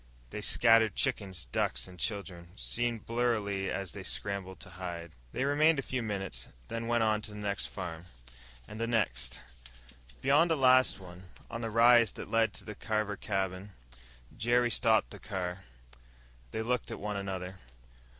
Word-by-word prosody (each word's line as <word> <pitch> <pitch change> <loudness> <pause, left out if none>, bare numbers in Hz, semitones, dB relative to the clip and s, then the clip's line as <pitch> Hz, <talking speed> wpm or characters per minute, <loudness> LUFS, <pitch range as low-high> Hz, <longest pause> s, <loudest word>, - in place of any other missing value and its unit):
They 105 - -4
scattered 115 -1 +5
chickens, 100 - -1
ducks, 60 0 0
and 90 -1 -13
children 90 -5 -3
seen 120 +2 -1
blurrily 110 -4 0
as 95 -5 -3
they - - -6
scrambled 95 +9 -3
to 90 - -8
hide. 85 -2 -6 0.2
They 130 - -1
remained 150 +3 +4
a 135 - -1
few 130 -1 -2
minutes, 95 - -3
ostensibly - - -23
visiting, - - -27
then 115 - -4
went 120 -1 +3
on 110 -1 +2
to 110 - -6
the 105 - -9
next 100 -1 -2
farm, 85 -3 -6 0.6
and 105 +1 -8
the 115 - 0
next.... 65 - 0 0.8
Beyond 150 - +4
the 160 - +2
last 130 -3 +5
one, 90 0 -11 0.3
on 115 - -4
the 115 - -2
rise 115 +1 +6
that - - -8
led 115 -1 +3
to - - -9
the 105 - -6
Carver 110 -1 -1
cabin, 95 0 -2 0.6
Jerry 120 +1 +2
stopped 115 -2 +3
the - - -9
car. 95 -2 -4 0.8
They 110 - -3
looked 125 +1 -1
at - - -5
one 105 0 -3
another. 95 -1 -4
105 Hz, 170 wpm, -31 LUFS, 95-115 Hz, 0.8 s, rise